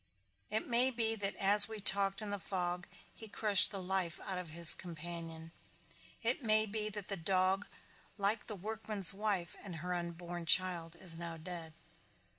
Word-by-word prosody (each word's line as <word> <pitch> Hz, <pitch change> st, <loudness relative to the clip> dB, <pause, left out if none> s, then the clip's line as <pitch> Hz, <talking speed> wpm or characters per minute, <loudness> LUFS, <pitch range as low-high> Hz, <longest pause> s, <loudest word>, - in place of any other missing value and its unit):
It 220 Hz, -, -2 dB
may 245 Hz, +2 st, +2 dB
be 230 Hz, -3 st, -1 dB
that 200 Hz, -2 st, -1 dB
as 205 Hz, +1 st, +7 dB
we 220 Hz, -1 st, -4 dB
talked 195 Hz, +1 st, +3 dB
in 205 Hz, -, -5 dB
the 205 Hz, -, -3 dB
fog 180 Hz, -1 st, -4 dB, 0.3 s
he 220 Hz, -, -11 dB
crushed 205 Hz, -1 st, +5 dB
the 200 Hz, -, -6 dB
life 185 Hz, -2 st, -3 dB
out 190 Hz, -2 st, -4 dB
of 180 Hz, -3 st, -8 dB
his 170 Hz, +1 st, +6 dB
companion. 165 Hz, -1 st, -7 dB, 0.7 s
It 240 Hz, +5 st, 0 dB
may 215 Hz, -2 st, +3 dB
be 215 Hz, 0 st, -3 dB
that 210 Hz, -2 st, -7 dB
the 200 Hz, -, -2 dB
dog 190 Hz, +3 st, 0 dB, 0.5 s
like 205 Hz, +2 st, -1 dB
the 215 Hz, -, -5 dB
workman's 210 Hz, -1 st, +1 dB
wife 195 Hz, -4 st, -2 dB
and 185 Hz, -4 st, -7 dB
her 180 Hz, +3 st, -4 dB
unborn 175 Hz, 0 st, -6 dB
child 175 Hz, -2 st, +3 dB
is 170 Hz, -2 st, -5 dB
now 170 Hz, -1 st, -6 dB
dead. 165 Hz, -1 st, -7 dB
190 Hz, 170 wpm, -34 LUFS, 170-210 Hz, 0.7 s, as